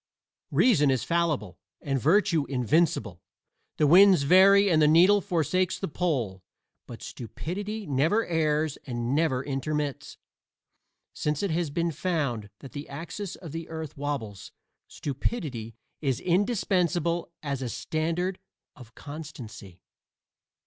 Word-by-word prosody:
Reason 165 Hz, -, +4 dB
is 130 Hz, -2 st, +1 dB
fallible 155 Hz, -, -1 dB, 0.2 s
and 135 Hz, -3 st, -2 dB
virtue 165 Hz, -, +3 dB
invincible; 130 Hz, -, 0 dB, 0.6 s
the 150 Hz, -, +3 dB
winds 185 Hz, +1 st, +7 dB
vary 195 Hz, +6 st, +6 dB
and 160 Hz, -4 st, +3 dB
the 150 Hz, -, +6 dB
needle 180 Hz, +6 st, +6 dB
forsakes 185 Hz, 0 st, 0 dB
the 195 Hz, -, -3 dB
pole, 130 Hz, -, -2 dB, 0.5 s
but -, -, -10 dB
stupidity 205 Hz, -, -5 dB
never 155 Hz, +11 st, +1 dB
errs 155 Hz, -2 st, 0 dB
and 120 Hz, 0 st, -2 dB
never 140 Hz, -4 st, +1 dB
intermits. 145 Hz, 0 st, -3 dB, 1.0 s
Since 150 Hz, +2 st, -2 dB
it 200 Hz, -, 0 dB
has 165 Hz, -1 st, 0 dB
been 170 Hz, +3 st, -1 dB
found 140 Hz, -, -2 dB
that 135 Hz, -, -10 dB
the 145 Hz, 0 st, -7 dB
axis 170 Hz, +7 st, -6 dB
of 165 Hz, -5 st, -10 dB
the 165 Hz, +1 st, -6 dB
earth 160 Hz, -2 st, -6 dB
wabbles, 135 Hz, -9 st, -5 dB, 0.4 s
stupidity 130 Hz, -, -4 dB, 0.3 s
is 135 Hz, -5 st, 0 dB
indispensable 175 Hz, -4 st, 0 dB
as 140 Hz, -3 st, -3 dB
a 125 Hz, -, -3 dB
standard 170 Hz, +7 st, -2 dB, 0.4 s
of 120 Hz, -5 st, -15 dB
constancy. 120 Hz, -, -10 dB
155 Hz, 120 wpm, -27 LUFS, 135-175 Hz, 1.0 s, winds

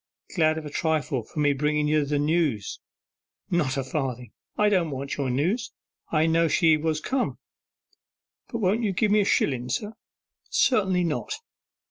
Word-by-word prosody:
'Glad 155 Hz, -3 st, +3 dB
of 160 Hz, -, -5 dB
a 150 Hz, -, -7 dB
trifle 155 Hz, -5 st, 0 dB
for 150 Hz, +7 st, -5 dB
bringen 150 Hz, +2 st, 0 dB
ye 155 Hz, +1 st, +3 dB
the 145 Hz, 0 st, 0 dB
news.' 145 Hz, -, 0 dB, 0.7 s
'Not 150 Hz, -6 st, +1 dB
a 135 Hz, -, 0 dB
farthing! 130 Hz, -3 st, -3 dB, 0.3 s
I 210 Hz, -, +4 dB
didn't 185 Hz, -6 st, +2 dB
want 140 Hz, 0 st, -4 dB
your 140 Hz, -2 st, -2 dB
news, 180 Hz, -, 0 dB, 0.4 s
I 155 Hz, -1 st, +3 dB
knew 165 Hz, 0 st, +3 dB
she 160 Hz, 0 st, +4 dB
was 155 Hz, 0 st, -1 dB
come.' 260 Hz, +10 st, -1 dB, 1.1 s
'Won't 220 Hz, -1 st, +1 dB
you 205 Hz, -4 st, 0 dB
give 210 Hz, +3 st, +1 dB
me 210 Hz, 0 st, +5 dB
a -, -, +1 dB
shillen, 125 Hz, -9 st, +1 dB
sir?' 210 Hz, +1 st, -2 dB, 0.6 s
'Certainly 190 Hz, -8 st, +2 dB
not. 150 Hz, -10 st, -2 dB
155 Hz, 155 wpm, -26 LUFS, 140-185 Hz, 1.1 s, me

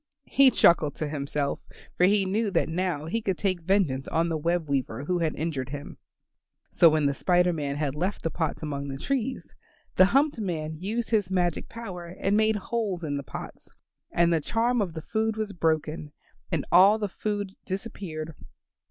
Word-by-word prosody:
He 275 Hz, -1 st, +7 dB
chuckled 160 Hz, -, +4 dB
to 155 Hz, -, -3 dB
himself, 140 Hz, -1 st, -2 dB, 0.4 s
for 180 Hz, -, +4 dB
he 200 Hz, 0 st, +3 dB
knew 210 Hz, +3 st, 0 dB
that -, -, +1 dB
now 165 Hz, -2 st, -1 dB
he 225 Hz, +8 st, -2 dB
could 190 Hz, -4 st, -1 dB
take 185 Hz, -3 st, 0 dB
vengeance 165 Hz, -7 st, +1 dB
on 165 Hz, +1 st, +1 dB
the 165 Hz, -, -1 dB
web 165 Hz, +1 st, 0 dB
weaver 135 Hz, -1 st, -1 dB
who 180 Hz, +4 st, 0 dB
had 160 Hz, -2 st, 0 dB
injured 145 Hz, -5 st, -3 dB
him. 145 Hz, 0 st, -7 dB, 0.7 s
So 170 Hz, -, +6 dB
when 155 Hz, -1 st, +2 dB
the 140 Hz, -, +2 dB
Spider 180 Hz, +4 st, +2 dB
Man 145 Hz, -3 st, -2 dB
had 145 Hz, -2 st, -1 dB
left 180 Hz, +7 st, -2 dB
the 165 Hz, -, -1 dB
pots 160 Hz, -1 st, -2 dB
among 140 Hz, -2 st, -3 dB
the 135 Hz, -1 st, -5 dB
trees, 260 Hz, -, -3 dB, 0.4 s
the 185 Hz, -, +8 dB
humped 275 Hz, +5 st, +2 dB
man 160 Hz, -6 st, -3 dB
used 220 Hz, +6 st, -3 dB
his 210 Hz, -5 st, +2 dB
magic 180 Hz, -3 st, 0 dB
power 185 Hz, -7 st, -7 dB
and 200 Hz, +1 st, +1 dB
made 220 Hz, 0 st, +3 dB
holes 210 Hz, -4 st, -2 dB
in 145 Hz, -2 st, -2 dB
the 140 Hz, -, -2 dB
pots, -, -, -9 dB, 0.4 s
and 170 Hz, 0 st, +3 dB
the 160 Hz, -, +2 dB
charm 235 Hz, +7 st, +1 dB
of 180 Hz, -5 st, -2 dB
the 160 Hz, -1 st, -6 dB
food 220 Hz, +2 st, -1 dB
was 215 Hz, -2 st, -3 dB
broken 155 Hz, -3 st, -1 dB, 0.4 s
and 165 Hz, -5 st, 0 dB
all 195 Hz, +4 st, +7 dB
the 210 Hz, -2 st, -2 dB
food 205 Hz, 0 st, -3 dB
disappeared. 185 Hz, -5 st, -5 dB
175 Hz, 185 wpm, -27 LUFS, 155-205 Hz, 0.7 s, the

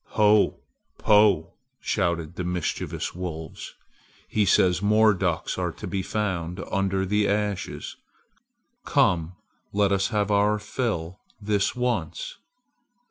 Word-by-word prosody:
"Ho! 105 Hz, -1 st, +4 dB, 0.4 s
Po!" 105 Hz, -6 st, +4 dB, 0.3 s
shouted 85 Hz, -5 st, -1 dB
the 90 Hz, -, -3 dB
mischievous 90 Hz, -2 st, -3 dB
wolves; 80 Hz, -3 st, -7 dB, 0.5 s
"he 105 Hz, -1 st, +1 dB
says 90 Hz, 0 st, +4 dB
more 105 Hz, +1 st, +5 dB
ducks 95 Hz, -, -1 dB
are -, -, -1 dB
to -, -, -8 dB
be 100 Hz, -1 st, -2 dB
found 95 Hz, -3 st, -2 dB
under 95 Hz, 0 st, 0 dB
the 105 Hz, +2 st, +1 dB
ashes! 105 Hz, -1 st, -2 dB, 0.9 s
Come! 90 Hz, -, +2 dB, 0.4 s
Let 100 Hz, -1 st, +2 dB
us 95 Hz, -1 st, +2 dB
have 105 Hz, -2 st, 0 dB
our 105 Hz, +1 st, +3 dB
fill 105 Hz, -5 st, -3 dB, 0.2 s
this 105 Hz, 0 st, 0 dB
once!" 125 Hz, -, -2 dB
100 Hz, 115 wpm, -25 LUFS, 90-105 Hz, 0.9 s, more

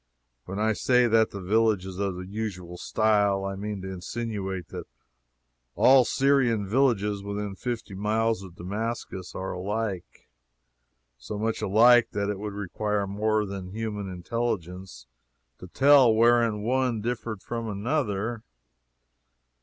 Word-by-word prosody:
When 95 Hz, -, -6 dB
I 110 Hz, +1 st, +2 dB
say 125 Hz, +3 st, +3 dB
that 115 Hz, -1 st, +3 dB
that 100 Hz, -, -7 dB
village 105 Hz, 0 st, +2 dB
is 95 Hz, 0 st, -7 dB
of 100 Hz, -2 st, -1 dB
the 90 Hz, 0 st, -7 dB
usual 95 Hz, -4 st, -5 dB
style, 100 Hz, 0 st, +1 dB
I 95 Hz, -, -3 dB
mean 100 Hz, -1 st, -5 dB
to 95 Hz, 0 st, -5 dB
insinuate 95 Hz, -2 st, -5 dB
that -, -, -7 dB, 0.9 s
all 130 Hz, -1 st, +6 dB
Syrian 130 Hz, -7 st, +2 dB
villages 105 Hz, -4 st, +1 dB
within 100 Hz, 0 st, -4 dB
fifty 115 Hz, 0 st, -5 dB
miles 110 Hz, +2 st, 0 dB
of 95 Hz, -3 st, -11 dB
Damascus 100 Hz, 0 st, -5 dB
are 95 Hz, -, -4 dB
alike 100 Hz, 0 st, -4 dB, 0.9 s
so 85 Hz, +12 st, -6 dB
much 110 Hz, +1 st, -2 dB
alike 120 Hz, +4 st, +5 dB
that 100 Hz, 0 st, -1 dB
it 100 Hz, -, -5 dB
would 105 Hz, 0 st, -5 dB
require 105 Hz, +1 st, -2 dB
more 105 Hz, +2 st, 0 dB
than 95 Hz, -2 st, -6 dB
human 105 Hz, -3 st, -4 dB
intelligence 90 Hz, -, -4 dB, 0.5 s
to 90 Hz, -, -10 dB
tell 135 Hz, +3 st, +6 dB
wherein 115 Hz, -2 st, +3 dB
one 125 Hz, -1 st, 0 dB
differed 115 Hz, -3 st, -4 dB
from 115 Hz, -1 st, -4 dB
another. 110 Hz, 0 st, -2 dB
105 Hz, 135 wpm, -26 LUFS, 95-115 Hz, 0.9 s, all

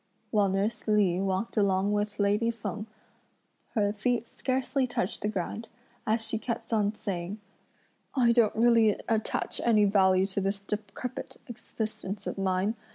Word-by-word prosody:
While 205 Hz, -2 st, +3 dB
nurse 205 Hz, +4 st, -1 dB
Li 200 Hz, -4 st, +3 dB
walked 195 Hz, +4 st, -1 dB
along 200 Hz, -1 st, +2 dB
with 210 Hz, 0 st, -1 dB
lady 205 Hz, +3 st, +2 dB
Feng, 225 Hz, -1 st, -4 dB, 0.9 s
her 205 Hz, -2 st, +2 dB
feet 235 Hz, +2 st, 0 dB
scarcely 260 Hz, +1 st, -1 dB
touched 200 Hz, -6 st, -2 dB
the -, -, 0 dB
ground, 215 Hz, +2 st, -3 dB, 0.4 s
as 220 Hz, +1 st, +2 dB
she 220 Hz, -, 0 dB
kept 230 Hz, 0 st, -4 dB
on 210 Hz, -1 st, +2 dB
saying: 190 Hz, 0 st, -4 dB, 0.8 s
"I 245 Hz, -3 st, +4 dB
don't 235 Hz, -3 st, +3 dB
really 230 Hz, -2 st, +4 dB
attach 220 Hz, -1 st, -1 dB
any 215 Hz, -3 st, +5 dB
value 190 Hz, -2 st, +4 dB
to 195 Hz, 0 st, -2 dB
this 195 Hz, +1 st, -1 dB
decrepid 215 Hz, +5 st, -5 dB
existence 215 Hz, -3 st, -5 dB
of -, -, -4 dB
mine! 190 Hz, +2 st, +1 dB
210 Hz, 145 wpm, -29 LUFS, 195-230 Hz, 0.9 s, any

